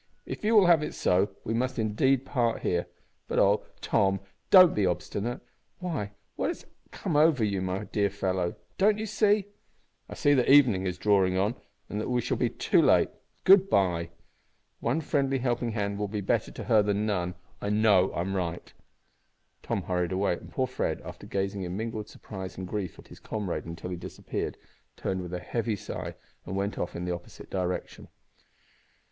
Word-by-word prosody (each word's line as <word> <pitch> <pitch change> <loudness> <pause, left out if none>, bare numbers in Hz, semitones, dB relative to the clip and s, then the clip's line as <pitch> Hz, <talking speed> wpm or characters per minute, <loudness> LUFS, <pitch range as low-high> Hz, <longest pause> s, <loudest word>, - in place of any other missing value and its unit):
If - - -6
you 220 +2 +3
will 205 -3 +8
have 170 -3 +6
it 150 - -4
so, 95 +3 +2
we 115 - -2
must 130 +2 -1
indeed 120 +5 +2
part 120 -4 0
here. 85 -1 0 0.4
But - - -2
oh! - - +4 0.2
Tom, 95 -1 +2 0.3
don't 185 -3 +9
be 105 - +1
obstinate! 100 +5 -2 0.4
Why, 165 - -3 0.3
what - - -1
has - - -4 0.2
come 155 - -3
over 150 -5 +4
you, 100 -3 0
my 95 +2 -2
dear 105 -1 0
fellow? 95 -2 -1 0.2
Don't 210 +2 +4
you 215 - -3
see 210 -1 +2 0.3
" - - -43
"I - - -7
see 145 -1 +3
that 130 -3 +2
evening 120 -10 +6
is 90 -1 -3
drawing 95 -2 +3
on, 100 +4 +2 0.3
and 105 - -3
that - - -3
we 125 -1 +2
shall - - -1
be - - +1
too - - +2
late. - - +4 0.3
Good 195 0 +7
bye! 85 -4 +2 0.7
One 135 +8 0
friendly 135 -2 +1
helping 120 -2 -1
hand 100 -2 -2
will 105 - -1
be 105 +1 -3
better 95 - 0
to - - -7
her 110 - +4
than 105 +1 0
none. 90 -4 -1 0.3
I 100 - -2
know 105 -3 +4
I'm 95 +3 -1
right." 85 -2 -3 0.9
Tom - - -2
hurried 90 -2 -1
away, 95 0 +1
and - - -8
poor 130 - 0
Fred, 130 - -2
after - - -9
gazing 100 0 -2
in 90 0 -4
mingled 110 -1 -4
surprise 95 -3 -8
and 95 0 -5
grief 100 -2 -4
at - - -15
his - - -13
comrade 105 -5 -4
until 85 +2 -6
he 90 - -3
disappeared, - - -5 0.4
turned 95 -1 -2
with 90 -1 -7
a 90 - -3
heavy 110 +5 -2
sigh 100 - -6 0.3
and 95 - -4
went 100 +1 -2
off 90 - -3
in 85 - -4
the 90 - -1
opposite 85 0 -10
direction. 90 -1 -3
105 Hz, 190 wpm, -28 LUFS, 95-125 Hz, 0.9 s, don't